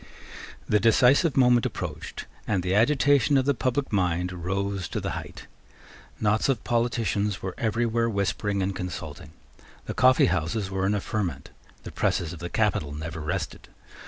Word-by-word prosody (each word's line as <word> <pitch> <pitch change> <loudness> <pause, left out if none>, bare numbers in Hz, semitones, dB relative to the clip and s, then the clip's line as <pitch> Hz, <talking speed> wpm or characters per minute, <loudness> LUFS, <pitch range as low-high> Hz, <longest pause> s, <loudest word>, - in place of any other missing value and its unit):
The 105 - +3
decisive 125 +8 +4
moment 125 -3 +5
approached; - - -5 0.2
and 95 -4 0
the 90 +1 0
agitation 140 +5 +4
of 130 - +2
the 140 - +3
public 130 0 -1
mind 90 -2 +1
rose 95 +2 -3
to - - -3
the - - -3
height. - - -7 0.7
Knots 110 +4 +1
of 125 -5 0
politicians 110 -4 0
were 95 -1 -3
everywhere 115 +1 +1
whispering 100 -1 -1
and 95 0 -2
consulting. 85 -3 -6 0.6
The - - -4
coffeehouses 95 -6 +2
were 95 0 0
in 105 - +1
a 100 - -1
ferment. 90 -12 -3 0.3
The - - -8
presses 85 -1 -1
of 85 - -9
the 85 - -5
capital 95 -9 0
never 80 +2 -6
rested. 75 0 -4
100 Hz, 155 wpm, -26 LUFS, 90-120 Hz, 0.7 s, moment